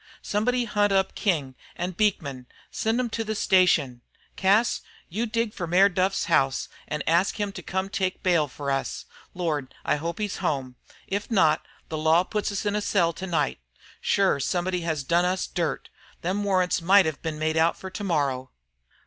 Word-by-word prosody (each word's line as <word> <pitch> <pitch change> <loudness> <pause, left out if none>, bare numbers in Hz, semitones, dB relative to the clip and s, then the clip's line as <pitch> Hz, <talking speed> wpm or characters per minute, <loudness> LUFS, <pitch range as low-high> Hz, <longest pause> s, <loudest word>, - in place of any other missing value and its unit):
Somebody 245 +4 0
hunt 205 -2 +1
up 195 -1 +2
King 155 -10 0 0.2
an' 175 +2 -3
Beekman 180 -8 0
an' 125 -1 -13 0.3
send 225 +1 0
them 250 -1 +1
to 225 - -2
the 220 0 -3
station. 170 -11 +3 0.3
Cas, 200 +5 +3 0.3
you 220 +7 -2
dig 230 -1 -1
for 175 - -4
Mayor 185 +4 +5
Duff's 190 +1 0
house 135 0 +1 0.2
an' 150 -1 -3
ask 170 +6 +2
him 205 -1 -1
to 190 - -8
come 190 +2 -2
to 195 - -4
take 185 -1 -1
bail 170 -5 +3
for 140 +1 -4
us. 135 0 -2 0.3
Lord! 155 -7 -2
I - - +2
hope 170 +3 -4
he's 210 -2 -3
home. 130 -4 -2 0.3
If 200 +1 -3
not, 160 -8 +3 0.2
the 155 - -3
law 160 +3 +4
puts 210 +2 -2
us 200 +1 -3
in 205 0 0
a 210 - 0
cell 175 -5 +2
to 190 - -6
night. 155 - 0 0.4
Shure 195 -7 +2
somebody 180 +5 -1
has 160 -4 -2
done 170 +5 +2
us 185 +1 0
dirt. 165 -6 -3 0.3
Them 190 +4 -1
warrants 185 -3 +1
might 195 +3 +6
have 155 -3 -3
been 160 -2 -3
made 155 +1 0
out 165 +1 +3
for 190 - -8
to 205 - -6
morrow." 140 -8 0
180 Hz, 190 wpm, -26 LUFS, 155-200 Hz, 0.4 s, might